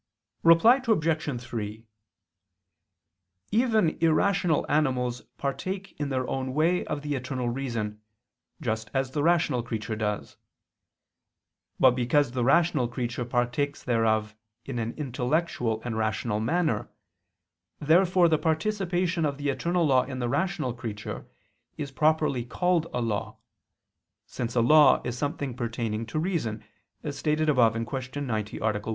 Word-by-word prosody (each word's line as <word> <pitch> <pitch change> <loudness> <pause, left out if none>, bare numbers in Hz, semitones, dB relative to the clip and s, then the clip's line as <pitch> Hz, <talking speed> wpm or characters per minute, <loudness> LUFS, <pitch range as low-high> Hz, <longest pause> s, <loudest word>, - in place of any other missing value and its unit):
Reply 220 +11 +6
Obj. 155 - +1
3: 110 -1 -5 1.7
Even 220 -5 +3
irrational 165 0 +2
animals 130 -5 0 0.2
partake 185 +8 -4
in 145 -1 -2
their 130 -2 -1
own 130 0 -3
way 170 +4 +2
of 150 -1 -4
the 145 0 -2
Eternal 130 -2 -2
Reason, 115 -5 -3 0.6
just 110 0 -2
as 135 -1 0
the 145 - -1
rational 170 -6 +2
creature 110 -2 -4
does. 105 -1 -3 1.4
But 130 - +7
because 125 +2 +1
the 125 -1 -1
rational 160 -1 +3
creature 120 0 -3
partakes 120 +4 -1
thereof 110 -2 +1 0.3
in 130 -3 -4
an 115 0 -2
intellectual 125 -4 -1
and 120 -2 -3
rational 110 0 -1
manner, 155 +9 0 0.9
therefore 175 +3 +4
the 155 -2 +2
participation 180 0 0
of 145 -2 0
the 145 0 -2
eternal 170 +5 0
law 130 -3 +4
in 130 0 -6
the 120 -1 -2
rational 155 -3 -1
creature 110 -3 -6 0.5
is 145 -3 -5
properly 150 -3 +2
called 170 +6 0
a 125 - -2
law, 110 -3 -2 0.9
since 120 0 -5
a 120 - +4
law 150 +5 +6
is 120 -1 -3
something 140 -1 -3
pertaining 115 -2 -3
to 140 - -4
reason, 155 - -2 0.4
as 145 -2 -5
stated 155 0 +1
above 120 -6 +4
(Q. 130 +4 -4
90, 110 -6 -3
A. - - -9 0.2
1). - - -12
135 Hz, 135 wpm, -27 LUFS, 120-160 Hz, 1.7 s, But